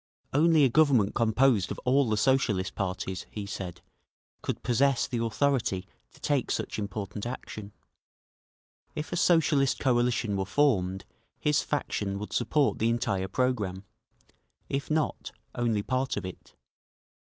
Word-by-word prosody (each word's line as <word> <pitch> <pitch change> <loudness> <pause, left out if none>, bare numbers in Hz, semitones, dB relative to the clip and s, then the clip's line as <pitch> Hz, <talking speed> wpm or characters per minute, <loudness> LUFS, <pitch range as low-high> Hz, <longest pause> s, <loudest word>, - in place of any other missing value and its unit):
Only 155 +1 +5
a 135 - +5
Government 130 -7 +4
composed 115 -2 +3
of - - -4
all 130 0 +3
the 110 - +1
Socialist 105 -6 +1
parties, 95 0 -3
he 105 -2 -6
said, 95 -3 -6 0.6
could - - -4
possess 130 +2 +2
the 120 -2 -2
authority 115 -5 0 0.3
to - - -19
take 145 -4 0
such - - -2
important 100 0 -5
action. 110 -4 -7 1.2
If 155 +3 -4
a - - 0
Socialist 155 -6 +3
coalition 120 -4 +1
were 95 - -1
formed, 95 -7 +1 0.3
his 150 -1 +2
faction 100 -9 -2
would 105 +1 -6
support 145 -3 +1
the 115 - +2
entire 110 -5 0
programme; 105 -4 -1 0.9
if 140 0 -2
not, 155 0 -1 0.2
only 115 -4 0
part 130 +3 -1
of - - -3
it. 95 - -10
120 Hz, 135 wpm, -28 LUFS, 100-135 Hz, 1.2 s, Only